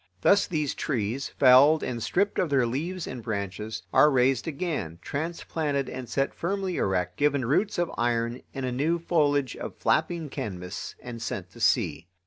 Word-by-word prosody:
Thus 200 - +4
these 150 -5 -1
trees, 120 -1 -2
felled 140 +4 +6
and 120 -2 -3
stripped 200 - 0
of 175 - +1
their 135 -3 +3
leaves 160 +9 -3
and 125 -2 -6
branches, 105 0 -4
are 150 - +7
raised 130 -1 +2
again, 150 - -3
transplanted 145 - -2
and 125 -2 -6
set 135 0 0
firmly 190 +1 -2
erect, 90 -2 0
given 145 -3 +2
roots 195 - +1
of 175 -1 0
iron 120 0 0
and 135 -1 -4
a 125 - -2
new 150 +7 +1
foliage 145 -6 +1
of - - -6
flapping 160 0 +1
canvas, 90 -6 -5
and 120 -2 -7
sent 95 -5 -4
to 115 - -14
sea. 85 - +1
135 Hz, 165 wpm, -27 LUFS, 115-160 Hz, -, are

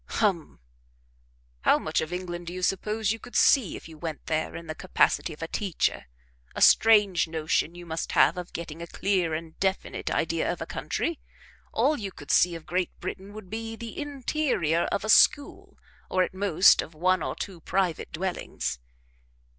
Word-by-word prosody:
"Hum! 195 -8 0 1.0
How - - +4
much - - -1
of 160 - -5
England 175 -1 -5
do 175 - -5
you 185 0 -5
suppose 210 +3 0
you 225 - -3
could 230 - -12
see 235 - +4
if - - -9
you 160 -2 -13
went 160 -2 -6
there 160 0 -2
in 170 - -7
the 155 - -5
capacity 180 0 +1
of 155 +1 -8
a - - -3
teacher? 190 - -1 0.5
A - - -4
strange 205 -6 +5
notion 160 +1 -1
you 175 0 -10
must 165 0 -4
have - - +5
of 180 -1 -7
getting 165 -1 -7
a 170 - -6
clear 180 -4 0
and 160 0 -8
definite 190 0 -1
idea - - 0
of - - -5
a - - -4
country! 335 -2 -3 0.5
All 305 - +2
you 200 -3 -5
could 145 -5 -7
see 175 -1 +4
of 165 - -9
Great 180 0 -2
Britain 195 +2 -6
would 210 -4 -11
be 225 +1 -4
the 230 0 -8
interior 275 - 0
of 200 - -1
a - - -3
school, 285 +6 +3 0.3
or 185 0 +2
at 185 - -4
most 190 -2 +5
of 160 - -10
one 185 +2 +2
or - - -3
two 190 -4 -6
private 185 -3 -1
dwellings." 160 - -3
180 Hz, 185 wpm, -27 LUFS, 165-205 Hz, 1.0 s, strange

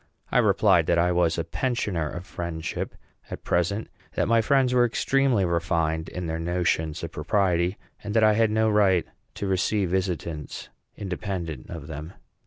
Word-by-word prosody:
I - - +4
replied - - +4
that - - +3
I 90 +1 +3
was 85 -2 +2
a 85 - 0
pensioner 100 - -1
of 90 +3 -7
friendship 85 -3 -4 0.3
at - - -7
present; 95 +5 0 0.3
that 115 +1 +3
friends 130 +1 +3
were 125 -1 +5
extremely 125 -2 +2
refined 85 -2 0
in 90 0 -5
their 80 0 -3
notions 80 -2 -1
of 85 - -4
propriety; 90 +2 +1 0.3
and 105 0 -4
that 110 - +5
I 110 0 +6
had 110 +1 +3
no 110 +1 +2
right 100 -5 +3 0.3
to - - -4
receive 95 0 +1
visitants 85 -5 -3 0.3
independent 90 - -4
of 80 -4 -7
them. 80 +3 -7
90 Hz, 160 wpm, -25 LUFS, 85-105 Hz, 0.3 s, I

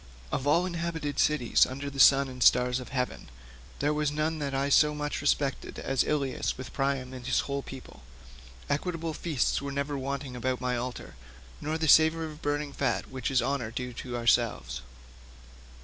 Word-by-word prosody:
Of 135 - -2
all 170 +5 +4
inhabited 165 -4 -3
cities 150 -6 +3
under 140 +2 -6
the 140 -1 -6
sun 135 0 +7
and 125 -1 -9
stars 125 +1 +4
of 125 - -9
heaven, 125 -2 -3 0.5
there 145 +1 +1
was 150 -1 +1
none 155 +2 -1
that 140 -2 -2
I 135 +1 0
so 150 +1 +5
much 150 -1 -3
respected 140 -1 0
as 135 -1 0
Ilius 140 -4 -1
with 130 - -8
Priam 135 -2 -1
and 125 -1 -8
his 125 - +2
whole 140 0 -3
people. 130 - -11 0.7
Equitable 165 +2 -2
feasts 150 -6 0
were 140 0 -4
never 140 +1 -2
wanting 135 -1 -4
about 130 +1 -1
my 125 0 -1
altar, 125 +1 -5 0.5
nor 155 +2 -2
the 160 0 -1
savour 160 +2 +6
of 155 -1 -9
burning 145 -1 -2
fat, 135 -5 -1
which 130 -2 -3
is 135 -2 +2
honour 135 -5 -1
due 125 +2 -5
to 120 0 -5
ourselves." 115 - +1
140 Hz, 180 wpm, -28 LUFS, 125-150 Hz, 0.7 s, sun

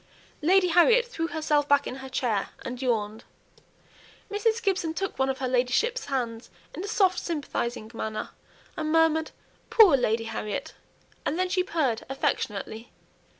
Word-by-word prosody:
Lady 365 +3 +4
Harriet 455 +9 +5
threw 330 -9 -3
herself 305 -3 0
back 285 0 +4
in 255 - -5
her 265 0 -8
chair, 235 -6 -1 0.2
and 250 0 -5
yawned; 220 -3 -1 1.1
Mrs. 440 +2 +1
Gibson 380 -7 -1
took 390 -4 -3
one 265 0 +2
of 265 - -1
her 260 - -2
ladyship's 255 - +1
hands 240 -4 -3 0.2
in 350 - -6
a - - -4
soft 380 -4 +2
sympathizing 245 -8 -3
manner, 220 -1 -4 0.4
and 310 -1 -2
murmured, 320 -1 +3 0.4
"Poor 405 -10 +7
Lady 230 -3 +1
Harriet!" 220 -2 -4 0.5
and 305 - -1
then 370 0 0
she 370 0 +2
purred 290 -11 -1
affectionately. 225 -4 -3
285 Hz, 150 wpm, -27 LUFS, 240-360 Hz, 1.1 s, Poor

